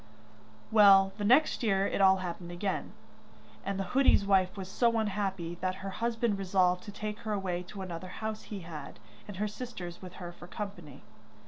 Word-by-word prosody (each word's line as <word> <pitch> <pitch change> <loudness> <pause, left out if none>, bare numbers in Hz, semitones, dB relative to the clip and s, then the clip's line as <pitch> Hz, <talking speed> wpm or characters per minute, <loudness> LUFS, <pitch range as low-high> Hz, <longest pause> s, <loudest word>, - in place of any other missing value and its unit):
Well, 195 -3 +7
the - - -2
next 265 +9 +4
year 195 -4 +2
it 200 - 0
all 190 0 +7
happened 175 -1 -5
again, 185 +2 -3 0.7
and 195 0 -2
the - - 0
hoodie's 265 -6 +5
wife 190 -1 +3
was 190 -1 -5
so 230 +4 +2
unhappy 195 -5 -2
that 185 0 0
her 195 - -3
husband 230 -1 -1
resolved 180 -1 +2
to 205 - -7
take 210 +1 -5
her 215 -1 -3
away 185 -3 -2
to 195 0 -7
another 180 0 -6
house 215 +3 -5
he 200 -3 -6
had, 155 -4 -8 0.3
and 205 -2 -8
her 210 +2 0
sisters 200 -6 -7
with 185 -1 -9
her 175 -2 -7
for 175 0 -12
company. 180 -9 -7
195 Hz, 185 wpm, -30 LUFS, 180-210 Hz, 0.7 s, Well